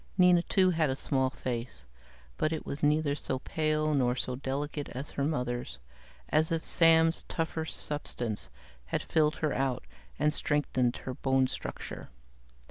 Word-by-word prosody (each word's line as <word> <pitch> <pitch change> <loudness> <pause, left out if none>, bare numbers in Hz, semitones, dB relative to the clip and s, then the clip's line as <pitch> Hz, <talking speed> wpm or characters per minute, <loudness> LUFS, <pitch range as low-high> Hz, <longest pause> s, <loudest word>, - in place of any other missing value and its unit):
Nina, 180 -2 +6
too, 185 +1 +3
had 160 -4 +2
a 130 - 0
small 130 -1 0
face, 120 -2 -5 0.5
but 155 - 0
it 160 - -3
was 140 - -5
neither 150 0 +3
so 135 -2 -3
pale 155 +2 0
nor 125 -3 +2
so 125 0 -2
delicate 145 +3 -3
as 135 +4 -5
her 140 - -2
mother's, 125 - -2 0.5
as 155 +1 +2
if 165 -1 -1
Sam's 165 0 +5
tougher 160 -1 -2
substance 125 -9 -4 0.4
had 65 - -2
filled 155 -1 +2
her 155 -3 -1
out 130 -2 -1 0.3
and 150 +1 +2
strengthened 130 -4 0
her 130 - -3
bone 135 +1 +2
structure. - - -6
145 Hz, 150 wpm, -30 LUFS, 130-155 Hz, 0.5 s, Nina